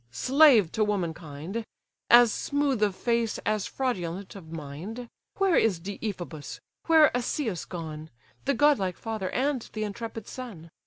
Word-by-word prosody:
slave 240 - +5
to 220 - +1
womankind, 175 0 -3 0.5
As 240 -1 +7
smooth 280 -5 0
of 205 -3 +2
face 235 0 0
as 215 -2 0
fraudulent 195 -8 -3
of 165 -5 -11
mind! 165 +11 -7 0.3
Where 390 -3 +3
is 195 -7 +3
Deiphobus, 180 - -6 0.3
where 320 -2 +6
Asius 240 - -2
gone? 160 -3 -7 0.4
The 280 0 +2
godlike 235 - +3
father, 220 -5 -4
and 270 0 0
th' 225 - -13
intrepid 220 +1 -4
son? 195 -11 -8
215 Hz, 135 wpm, -27 LUFS, 170-245 Hz, 0.5 s, As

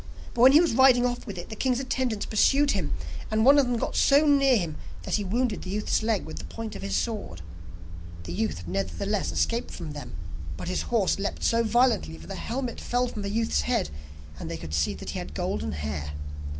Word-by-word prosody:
But 235 - -1
when 260 +2 +9
he 300 - +9
was 340 -5 +3
riding 255 0 +6
off 245 0 -2
with 200 -3 -6
it, 175 - -7
the 220 - -6
king's 255 +1 +1
attendants 260 -5 -1
pursued 275 +6 +3
him, 180 -8 -1 0.3
and 220 +1 +2
one 280 +2 +8
of 270 - +3
them 245 -1 0
got - - -3
so 285 +2 +5
near 275 -3 +5
him 170 -6 -3 0.3
that - - -4
he 210 - +2
wounded 225 +3 0
the 185 - -7
youth's 210 +3 0
leg 220 -3 0
with 160 - -7
the - - -8
point 225 -1 -6
of - - -7
his 100 0 -2
sword. 200 - -3 0.8
The 85 0 -6
youth 90 -4 -2
nevertheless 85 -3 -2
escaped 230 - 0
from 165 -4 -7
them, 145 - -8 0.4
but - - -5
his 185 - 0
horse 215 -5 +2
leapt 200 - -3
so 230 0 +3
violently 230 - +2
that 80 - -12
the - - -6
helmet 245 0 -4
fell 245 +1 0
from 215 - -6
the 200 - -3
youth's 225 +2 +1
head, 235 -5 0 0.5
and - - -6
they 85 - -4
could 80 -1 -8
see 75 -1 +1
that - - -6
he - - -4
had - - -7
golden 70 +1 -2
hair. 75 0 -4
215 Hz, 225 wpm, -27 LUFS, -, 0.8 s, when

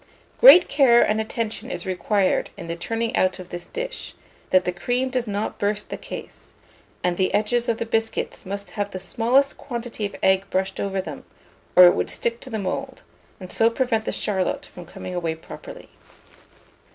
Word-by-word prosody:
Great 415 -8 +9
care 265 -4 +5
and 215 +1 +1
attention 220 0 -4
is 175 -1 -5
required 190 +1 +1
in 175 - -7
the 170 0 -4
turning 225 +6 -2
out 185 0 +2
of 185 -2 -10
this 175 0 -7
dish, - - -5 0.3
that 185 -1 +4
the 180 - +1
cream 245 +9 -1
does 250 -2 -1
not 205 +1 -3
burst 205 +1 -1
the - - -2
case; - - -10 0.5
and 180 -1 0
the 185 - +1
edges 235 +3 +1
of 230 - +1
the 230 - -3
biscuits 225 0 -2
must 200 +1 -5
have 205 -2 -3
the 190 - -6
smallest 240 +9 +1
quantity 235 -3 -6
of 200 - -3
egg 190 +1 +3
brushed 190 +1 -1
over 195 -1 -1
them, - - -8 0.5
or 180 - +10
it 175 - +7
would - - -1
stick 235 0 -1
to 265 - -10
the 225 - -3
mould, 190 -3 -4 0.4
and 185 -2 -9
so 225 - +4
prevent 230 -2 0
the - - -1
charlotte 190 -3 -1
from 175 -2 -12
coming 185 - -8
away 170 -2 -2
properly. 160 - -11
205 Hz, 190 wpm, -23 LUFS, 185-235 Hz, 0.5 s, or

